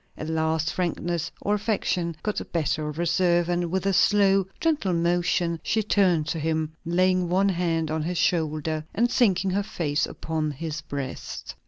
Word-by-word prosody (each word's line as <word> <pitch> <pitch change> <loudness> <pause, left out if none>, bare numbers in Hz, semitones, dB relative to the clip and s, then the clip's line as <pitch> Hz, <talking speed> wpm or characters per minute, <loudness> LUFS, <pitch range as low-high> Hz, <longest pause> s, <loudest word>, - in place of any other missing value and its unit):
At 155 - -5
last 160 0 0
frankness, 170 -2 -2
or 205 - 0
affection, 195 -5 -1
got 210 -1 -2
the - - -2
better 155 -1 -1
of 150 - -7
reserve; 175 0 +2
and, 175 -1 0
with 190 +2 -1
a 195 - +2
slow, 195 0 +4
gentle 300 - +1
motion 170 0 +1
she 220 +4 0
turned 185 -6 +2
to 165 - -2
him, 155 0 -1
laying 180 +1 +2
one 195 +3 +3
hand 165 -3 0
on 160 0 -1
his 175 +3 -2
shoulder, 155 -2 0
and 240 +2 +2
sinking 195 -5 +2
her 200 +2 +1
face 155 -7 -1
upon 160 -1 -3
his 155 +2 -5
breast. 140 -4 -6
170 Hz, 170 wpm, -25 LUFS, 160-185 Hz, -, slow